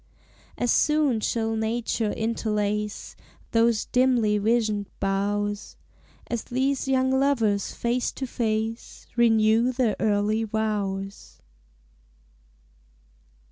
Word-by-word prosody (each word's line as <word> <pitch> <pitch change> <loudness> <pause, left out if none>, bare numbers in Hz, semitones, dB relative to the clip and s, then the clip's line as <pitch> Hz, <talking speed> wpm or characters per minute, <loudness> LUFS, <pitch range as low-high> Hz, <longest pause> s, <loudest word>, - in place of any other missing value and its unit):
As 245 - +1
soon 300 -6 +2
shall 225 +1 -1
nature 220 -1 -1
interlace 210 -2 -2 0.4
Those 230 -1 +2
dimly 245 -5 +2
visioned 215 -2 0
boughs, 205 +1 -2 0.5
As 235 -2 -3
these 265 +2 -1
young 260 0 +2
lovers 250 -7 +1
face 240 +1 -1
to 270 - -4
face 225 -1 -3
Renew 225 0 +4
their 240 -4 +1
early 215 +1 +1
vows. 205 -3 -3
220 Hz, 90 wpm, -25 LUFS, 210-240 Hz, 0.5 s, Renew